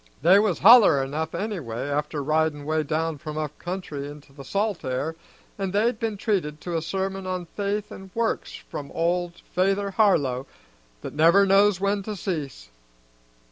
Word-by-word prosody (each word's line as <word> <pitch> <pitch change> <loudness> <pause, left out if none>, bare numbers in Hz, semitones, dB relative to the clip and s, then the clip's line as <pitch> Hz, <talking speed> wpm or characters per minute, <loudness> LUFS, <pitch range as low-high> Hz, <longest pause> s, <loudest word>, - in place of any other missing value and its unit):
"They 185 +5 +7
was 205 -5 +1
holler 200 - +7
enough 155 +4 -3
anyway 165 - -4
after 145 +1 -2
ridin' 155 0 0
'way 155 +1 +1
down 155 +1 -2
from 155 -1 -6
up 150 -1 -4
country 175 -6 -5
into 145 -1 -12
the 140 0 -10
salt 200 +5 -1
air, 130 +5 -2 0.4
and 195 -1 -2
they'd 220 +3 +1
been 225 -3 -2
treated 185 -9 -1
to 175 -1 -4
a 165 - 0
sermon 190 +3 -3
on 185 -1 -3
faith 205 +3 -3
an' 190 0 -10
works 230 -1 -1
from 140 -1 -8
old 175 +1 0 0.2
Fayther 195 +2 +1
Harlow 145 - +2 0.5
that - - -7
never 170 +6 +5
knows 195 0 +4
when 200 +1 0
to 210 +2 -5
cease. 150 - -5
175 Hz, 165 wpm, -25 LUFS, 150-200 Hz, 0.5 s, They